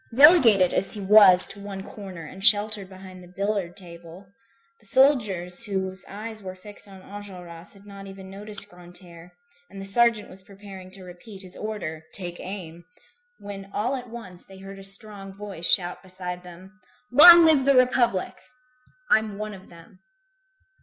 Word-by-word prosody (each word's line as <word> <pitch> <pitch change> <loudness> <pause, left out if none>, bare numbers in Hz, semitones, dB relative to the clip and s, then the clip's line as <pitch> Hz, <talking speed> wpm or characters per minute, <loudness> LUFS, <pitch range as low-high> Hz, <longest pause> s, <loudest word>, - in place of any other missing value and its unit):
Relegated, 240 - +4
as 195 - +4
he 210 - -8
was, 195 -2 +8
to - - -4
one 200 -1 -10
corner, 190 -6 -12
and 190 +5 -13
sheltered 205 -2 0
behind 185 -1 -15
the 180 - -16
billiard 195 -1 -5
table, 170 0 -15 0.5
the - - -12
soldiers 210 -11 -1
whose 190 -2 -5
eyes 215 +2 -10
were 185 -1 -10
fixed 205 +2 -15
on 190 -1 -16
Enjolras, 180 -5 -13
had 200 0 -21
not 200 -1 -13
even 195 0 -13
noticed 205 +2 +3
Grantaire, 175 -1 -17 0.4
and 195 - -13
the 195 - -9
sergeant 230 +1 -1
was 190 - -17
preparing 195 -1 -15
to 190 0 -14
repeat 185 +3 -15
his 185 -1 -14
order: 185 -8 -8
"Take 175 -2 -4
aim!" 175 -3 -11 0.5
when 195 -1 -12
all 240 +6 -3
at 250 -2 -10
once, 190 -7 -13
they 190 - -17
heard 195 +1 -13
a - - -13
strong 195 0 -9
voice 200 -5 -7
shout 180 -2 -2
beside 180 -1 -9
them: 185 +3 -17 0.3
"Long 340 +6 +7
live 300 -5 +1
the 275 0 +2
Republic! 250 -6 0 0.8
I'm 220 -2 0
one 215 0 -8
of 190 -1 -16
them." 170 +2 -19
195 Hz, 165 wpm, -22 LUFS, 185-210 Hz, 0.8 s, was